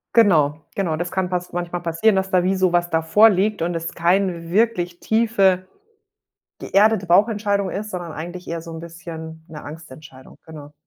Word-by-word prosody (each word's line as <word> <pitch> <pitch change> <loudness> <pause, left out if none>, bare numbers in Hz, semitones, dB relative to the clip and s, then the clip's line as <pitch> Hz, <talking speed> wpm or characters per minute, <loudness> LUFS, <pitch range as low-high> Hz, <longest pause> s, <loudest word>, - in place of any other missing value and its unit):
Genau, 160 -9 +4
genau, 175 -6 -1
das 175 +2 -4
kann 185 -1 -1
pass 180 -1 -3
manchmal 175 0 -4
passieren, 170 +6 +1
dass 190 0 -1
da 180 -1 +4
wie 190 +2 +1
so 185 -1 +2
was 175 0 +1
davor 165 +8 +5
liegt 205 0 0
und 170 +1 -1
es 165 0 -4
keine 175 -1 0
wirklich 180 -4 0
tiefe 195 -5 +2 0.9
geerdete 205 -1 +2
Bauchentscheidung 200 +1 +2
ist, 210 +2 -5
sondern 175 -2 -5
eigentlich 175 +3 -8
eher 165 0 -3
so 165 0 -10
'n 160 - -7
bisschen 160 -1 -9
'ne 155 -3 -10
Angstentscheidung, 145 -3 -12
genau. 150 -2 -11
175 Hz, 170 wpm, -21 LUFS, 165-195 Hz, 0.9 s, davor